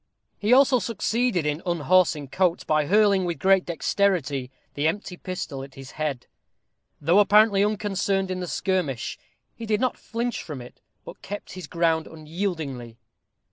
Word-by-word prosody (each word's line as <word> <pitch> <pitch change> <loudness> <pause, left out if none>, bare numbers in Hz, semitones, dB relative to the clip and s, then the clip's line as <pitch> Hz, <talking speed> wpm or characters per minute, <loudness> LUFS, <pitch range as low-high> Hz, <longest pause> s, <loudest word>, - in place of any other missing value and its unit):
He 210 +2 0
also 260 0 +6
succeeded 230 -4 0
in 150 +2 -1
unhorsing 170 -4 +2
Coates, 180 +3 +1
by 155 -1 +1
hurling, 200 0 +4
with 175 -2 -2
great 190 -1 +3
dexterity, 165 -7 0 0.2
the 145 +2 0
empty 180 +2 -3
pistol 175 -7 -5
at 135 -1 -12
his 135 0 -10
head. 150 -5 -3 0.7
Though 175 +5 +4
apparently 205 0 +5
unconcerned 195 -2 0
in 185 - -3
the 180 - -4
skirmish, 175 - -2 0.3
he 230 - -8
did 210 -1 +1
not 255 0 -1
flinch 235 +1 -3
from 150 -5 -7
it, 120 0 -13 0.2
but - - -11
kept 205 +1 -7
his 185 -4 -8
ground 165 -2 +1
unyieldingly. 155 - -5
180 Hz, 150 wpm, -25 LUFS, 155-205 Hz, 0.7 s, also